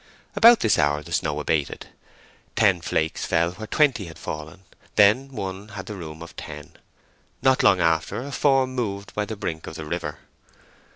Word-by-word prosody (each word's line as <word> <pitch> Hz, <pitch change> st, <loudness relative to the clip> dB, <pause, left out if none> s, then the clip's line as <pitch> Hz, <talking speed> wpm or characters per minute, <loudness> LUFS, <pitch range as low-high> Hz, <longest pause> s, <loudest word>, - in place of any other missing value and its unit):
About 235 Hz, +1 st, +7 dB
this 105 Hz, -7 st, +3 dB
hour 75 Hz, 0 st, +1 dB
the -, -, -12 dB
snow 75 Hz, -1 st, 0 dB
abated: 75 Hz, -1 st, -2 dB, 0.7 s
ten 100 Hz, -5 st, +3 dB
flakes 80 Hz, -1 st, -1 dB
fell 85 Hz, +1 st, +1 dB
where 110 Hz, +4 st, -8 dB
twenty 135 Hz, -8 st, +2 dB
had 80 Hz, -, -10 dB
fallen, 80 Hz, +5 st, -7 dB, 0.3 s
then 110 Hz, +7 st, +4 dB
one 100 Hz, -4 st, -5 dB
had 100 Hz, -3 st, -8 dB
the 105 Hz, -, -6 dB
room 80 Hz, -4 st, -8 dB
of 85 Hz, -, -12 dB
ten. 75 Hz, -1 st, -9 dB, 0.7 s
Not 130 Hz, -1 st, +4 dB
long 95 Hz, -, +5 dB
after 80 Hz, +7 st, +1 dB
a 140 Hz, -, -7 dB
form 135 Hz, -2 st, +2 dB
moved 100 Hz, -5 st, -4 dB
by 105 Hz, -, -1 dB
the 110 Hz, -, -5 dB
brink 85 Hz, -6 st, -5 dB
of 80 Hz, -, -7 dB
the 80 Hz, -, -6 dB
river. 80 Hz, -1 st, -4 dB
95 Hz, 175 wpm, -24 LUFS, 80-110 Hz, 0.7 s, About